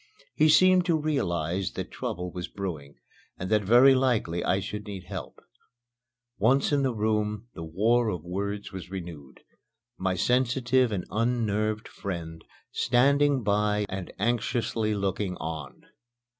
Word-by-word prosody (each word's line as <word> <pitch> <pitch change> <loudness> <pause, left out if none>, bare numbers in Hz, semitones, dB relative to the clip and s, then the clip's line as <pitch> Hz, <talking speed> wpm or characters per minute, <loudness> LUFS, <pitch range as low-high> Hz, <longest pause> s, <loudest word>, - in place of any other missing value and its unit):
He 155 - +4
seemed 185 +3 +6
to 165 -2 +3
realize 95 - -1
that - - -5
trouble 90 +1 -4
was 90 0 -5
brewing 80 -8 -6 0.4
and 95 +2 -5
that 105 -1 +4
very 120 +7 +6
likely 120 -10 +1
I 95 - +1
should 105 +2 -6
need 100 -3 -6
help. - - -8 1.0
Once 130 +9 +3
in 145 -1 +2
the 135 -1 +1
room, 105 +1 -1
the 80 - -7
war 110 +8 +2
of 90 -6 -4
words 100 +3 -4
was 95 -3 -8
renewed, 85 -8 -8 0.6
my 95 0 0
sensitive 125 +2 +2
and 95 -4 -2
unnerved 110 -2 0
friend 85 -4 -6 0.3
standing 140 +2 +3
by 105 0 +1
and 95 -2 -5
anxiously 115 0 0
looking 100 -1 -2
on. 80 -4 -6
105 Hz, 135 wpm, -27 LUFS, 90-120 Hz, 1.0 s, seemed